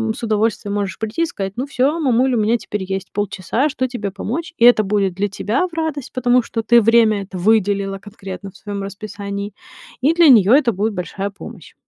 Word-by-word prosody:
с - - -10
удовольствием 215 -1 0
можешь 200 -4 -2
прийти 220 +10 -2
и - - +3
сказать: 195 - -5
"Ну, 255 - -2
всё, 275 +5 0
мамуль, 260 -2 +2
у - - +1
меня 225 +3 +2
теперь 205 -1 -5
есть 190 0 -5
полчаса, 205 - -1
что 260 -2 -2
тебе 210 -5 -4
помочь?" 250 - -5
И - - 0
это 240 -3 +6
будет 195 -2 0
для 200 +2 0
тебя 220 - -1
в 340 - -20
радость, 315 -5 -3
потому 250 0 +3
что 225 0 -4
ты 235 +1 +5
время 220 -2 +3
это 190 -1 -9
выделила 200 -1 +1
конкретно 195 -1 -9
в - - -17
своём 205 -1 -6
расписании, 200 0 -6 0.5
и 290 +5 +3
для 335 -3 +6
неё 220 -3 +6
это 265 -4 +4
будет 210 +2 -1
большая 195 +2 -4
помощь. 200 -2 -12
215 Hz, 205 wpm, -19 LUFS, 200-245 Hz, 0.5 s, это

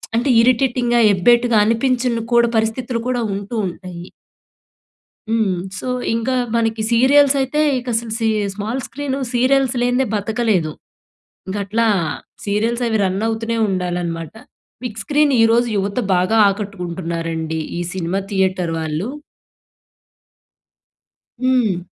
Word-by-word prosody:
అంటే, 240 +4 +1
ఇరిటేటింగ్‌గా, 240 0 +2
ఎబ్బేటుగా 235 +4 +3
అనిపించను 240 +1 +1
కూడా, 235 0 +5
పరిస్థితులు 230 +2 -1
కూడా 250 -1 0
ఉంటూ, 200 +4 -6
ఉంటాయి. 180 -1 -8 1.3
హ్మ్. 215 -6 +1 0.2
సో, - - -6 0.3
ఇంకా 230 +3 -1 0.2
మనకి 225 -1 0
సీరియల్స్ 275 +4 +5
అయితే, 265 +3 -1 0.2
ఇక 250 - -12
అసలు 225 0 -2
సీ 225 - +1 0.3
స్మాల్ 220 +6 -3
స్క్రీను 280 0 -4
సీరియల్స్ 260 +1 +2
లేనిదే, 245 +2 +2
బ్రతకలేదు. 210 -6 0 0.9
గట్లా 215 +3 0 0.6
సీరియల్స్ 225 +4 0
అవి 220 -1 +1
రన్ 190 +2 -1
అవుతూనే 225 +1 -2
ఉండాలన్నమాట. 175 -3 -3 0.5
బిగ్ 225 -3 -5
స్క్రీన్ 295 +3 +2
ఈరోజు 230 +2 +4
యువత 200 +4 -1 0.2
బాగా 185 +5 +2
ఆకట్టుకుంటున్నారండి. 170 -5 -4 0.2
ఈ - - -1
సినిమా 185 +1 -1
థియేటర్ 185 -3 0
వాళ్ళు. 160 +4 -3 2.3
హ్మ్. 245 -9 +1
225 Hz, 110 wpm, -19 LUFS, 190-245 Hz, 2.3 s, కూడా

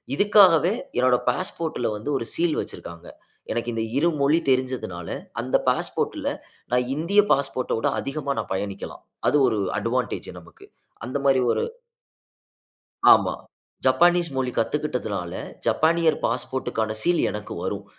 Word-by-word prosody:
இதுக்காகவே 195 -3 +5 0.2
என்னுடைய 125 0 +3
பாஸ்போர்ட்ல 160 -5 -3
வந்து 110 +8 -6
ஒரு 115 - -4
சீல் 170 -2 +1
வச்சிருக்கிறாங்க. 85 0 -8 0.4
எனக்கு 120 +1 -2
இந்த 110 0 -1
இரு 170 +4 +3
மொழி 150 +4 +4
தெரிஞ்சதனால 125 -10 -1 0.3
அந்த - - -1
பாஸ்போர்ட்ல - - -1 0.4
நான் 125 0 +2
இந்திய 190 +7 +3
பாஸ்போர்ட்ட 135 -2 0
விட - - 0
அதிகமா 140 0 -3
நான் - - -5
பயணிக்கலாம். 100 0 -5 0.2
அது 150 - +4
ஒரு 110 -4 0 0.2
அட்வான்டேஜ் - - -2
நமக்கு. - - -17 0.4
அந்த 130 +3 -3
மாதிரி 135 -1 +4
ஒரு - - 0 1.5
ஆமா. - - +3 0.5
ஜப்பானீஸ் 170 +5 +4
மொழி 130 -1 0
கத்துக்கிட்டதுனால, 115 - -2 0.3
ஜப்பானியர் 165 0 +3
பாஸ்போர்ட்க்கான 115 -3 -2
சீல் 175 -1 +2
எனக்கு 105 0 -6
வரும். 100 +1 -3
130 Hz, 125 wpm, -24 LUFS, 115-160 Hz, 1.5 s, இதுக்காகவே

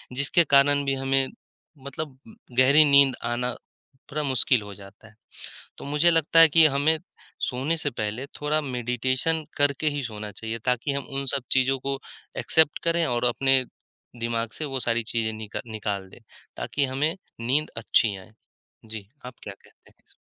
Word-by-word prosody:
जिसके 140 +6 +3
कारण 140 -1 +4
भी 135 - +1
हमें 135 0 +1 0.6
मतलब 140 0 -6
उम, - - -14 0.2
गहरी 140 +4 +7
नींद 140 -2 +5
आना 120 +1 -1 0.6
थोड़ा 150 +2 -2
मुश्किल 130 -3 +2
हो 105 -1 -9
जाता 100 +2 -15
है। 110 - -19 0.7
तो - - -8
मुझे 150 +4 +3
लगता 165 0 +4
है 165 - +9
कि 160 +2 +6
हमें 145 +2 +2 0.5
सोने 135 +6 -1
से 150 -2 -2
पहले 110 +2 -4
थोड़ा 150 +1 +1
मेडिटेशन 130 +4 -1
करके 145 +2 +1
ही 145 -1 -3
सोना 105 -3 -6
चाहिए 110 +3 -5
ताकि 125 +2 0
हम 140 0 -3
उन 140 0 -2
सब 140 - -2
चीज़ों 135 +1 +3
को 135 +1 -3 0.4
एक्सेप्ट 160 -2 +2
करें 170 0 +2
और 120 -2 -1
अपने 135 +2 +3 0.6
दिमाग 115 0 -2
से 155 - -3
वो 135 -3 -3
सारी 115 -1 0
चीज़ें 110 -1 0
निका 110 -1 -6
निकाल 105 -3 -4
दें - - -15 0.4
ताकि 145 - -1
हमें 150 +4 +1 0.3
नींद 135 +6 0
अच्छी 110 -2 +2
आए। 95 +2 -14 0.5
जी, 110 -3 -8 0.2
आप 125 0 -8
क्या 100 - -7
कहते - - -23
इसपे? - - -19
135 Hz, 170 wpm, -25 LUFS, 115-145 Hz, 0.7 s, है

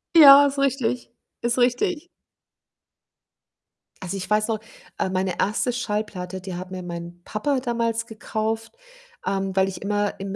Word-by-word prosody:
Ja, 285 -3 +10
ist 280 0 -1
richtig, 260 -3 0 0.3
ist 235 +1 0
richtig. 300 +8 +1 1.9
Also, 190 +1 -4
ich 190 - -6
weiß 210 +1 +2
noch, 220 - 0 0.4
äh, - - 0
meine 185 -1 -1
1. 215 +5 +1
Schallplatte, 210 -6 -3
die 185 -2 -6
hat 185 +1 -7
mir 185 -1 -5
mein 170 0 -7
Papa 270 +8 -1
damals 230 -2 -1
gekauft, 220 0 -3 0.5
ähm, 195 0 -1
weil 190 0 +3
ich 185 - -8
immer 205 0 -1
im 195 0 -4
215 Hz, 145 wpm, -24 LUFS, 190-245 Hz, 1.9 s, Ja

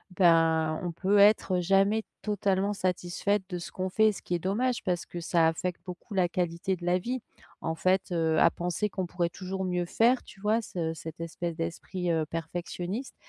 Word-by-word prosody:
ben 165 -3 +4
on 175 - -2
peut 195 +4 +1
être 200 -2 +5
jamais 195 +4 +3 0.2
totalement 200 -1 0
satisfaite 185 +2 0
de 180 - -3
ce 175 - -7
qu'on 185 0 -3
fait, 220 +3 +4
ce 200 - -9
qui 175 - -2
est - - -1
dommage 230 +8 0
parce 175 -2 -1
que 175 - -6
ça 165 -1 +3
affecte 175 +2 -2
beaucoup 185 +3 -9
la 185 -3 +2
qualité 175 +1 -1
de 175 -1 -9
la 180 +1 +3
vie. 250 +7 -3 0.4
En 160 - -1
fait, 185 +2 +1
heu, 160 -2 +1
à 170 - +6
penser 180 +4 -2
qu'on 190 -2 -3
pourrait 175 -1 -1
toujours 190 +1 -4
mieux 180 -1 0
faire, 240 +7 +3
tu 200 - -15
vois? 215 +3 +2
Ce 165 -6 -3
cette 160 0 -8
espèce 165 0 -4
d'esprit, 170 +2 -3
heu, 160 -1 +1
perfectionniste, 175 - -4
180 Hz, 195 wpm, -29 LUFS, 170-195 Hz, 0.4 s, à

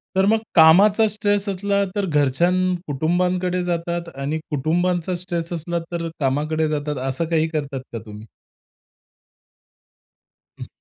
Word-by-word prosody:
तर 190 0 +3
मग 220 +2 +3 0.2
कामाचा 195 +7 +6
स्ट्रेस 205 -1 0
असला 200 +1 0
तर 205 - 0
घरच्यानं 175 +4 +2
कुटुंबानकडे 180 +5 0
जातात 170 0 -2
आणि 140 +3 -3
कुटुंबांचा 175 +5 0
स्ट्रेस 175 -1 -4
असला 170 +1 -3
तर 170 -1 -3
कामाकडे 155 +3 0
जातात, 150 -1 -2
असं 135 +6 -2
काही 160 -1 +1
करतात 140 -4 -3
का 115 - -3
तुम्ही? 105 0 -10 2.4
हं. - - -6
170 Hz, 120 wpm, -21 LUFS, 150-185 Hz, 2.4 s, कामाचा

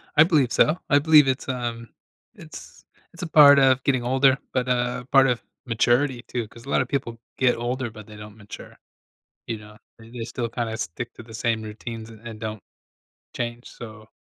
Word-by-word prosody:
I 150 - +8
believe 150 -8 +2
so. 155 +5 +3
I 145 - +5
believe 150 -1 +6
it's, 130 0 -1
um 120 -3 -4 0.5
it's - - -12 0.3
it's 170 - -11
a - - -3
part 145 -3 +8
of 130 -1 +3
getting 130 -3 +1
older, 130 +2 +3 0.2
but 125 -1 0
a 125 0 -1
part 135 -1 +6
of 125 -3 0 0.2
maturity, 120 +2 +1
too 120 -3 -4
'cause 115 +1 -15
a - - -10
lotta 135 - +2
people 125 -3 -4 0.2
get 125 -2 +3
older 120 +1 -3
but 110 -1 -12
they 105 - -12
don't 105 0 -11
mature. 105 -2 -12 0.7
You 115 -2 -4
know, 105 0 -14 0.2
they 115 +1 -8
still 120 0 -4
kinda 115 -1 -4
stick 115 +6 -5
to - - -11
the 115 -1 -14
same 115 0 -1
routines 110 +1 -8
a - - -12
and 110 -2 -8
don't 110 -2 -5 0.7
change, 120 0 -5
so, 110 -2 -11
120 Hz, 190 wpm, -24 LUFS, 115-130 Hz, 0.7 s, I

